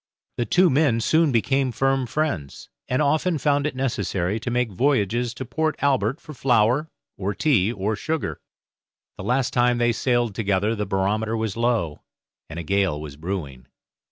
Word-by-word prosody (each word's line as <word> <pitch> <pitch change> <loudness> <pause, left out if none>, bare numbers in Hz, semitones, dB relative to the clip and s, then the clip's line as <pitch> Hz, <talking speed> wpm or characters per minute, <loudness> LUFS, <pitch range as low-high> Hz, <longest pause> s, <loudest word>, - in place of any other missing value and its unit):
The 120 - -1
two 180 -2 +4
men 135 -4 +3
soon 160 +5 +3
became 130 +3 +1
firm 135 +1 +1
friends, 115 - -3 0.2
and 130 +4 +1
often 155 +4 +1
found 145 0 +1
it 150 - -5
necessary 105 -6 -1
to 120 - -4
make 120 -2 0
voyages 120 0 +1
to 130 - -5
Port 155 +5 -1
Albert 135 -1 +1
for 155 - -11
flour, 125 +3 +2 0.3
or 100 +1 -2
tea, 115 -9 +2
or 105 0 -2
sugar. 125 - -3 0.8
The - - -7
last 125 0 0
time 120 0 +3
they 120 0 +2
sailed 120 -1 0
together 105 0 0
the 105 -2 -3
barometer 105 +4 0
was 110 -3 -2
low, 115 -10 0 0.5
and 80 - -8
a 85 - -4
gale 95 -3 +1
was 75 -2 -8
brewing. 75 -6 -5
120 Hz, 165 wpm, -23 LUFS, 100-135 Hz, 0.8 s, two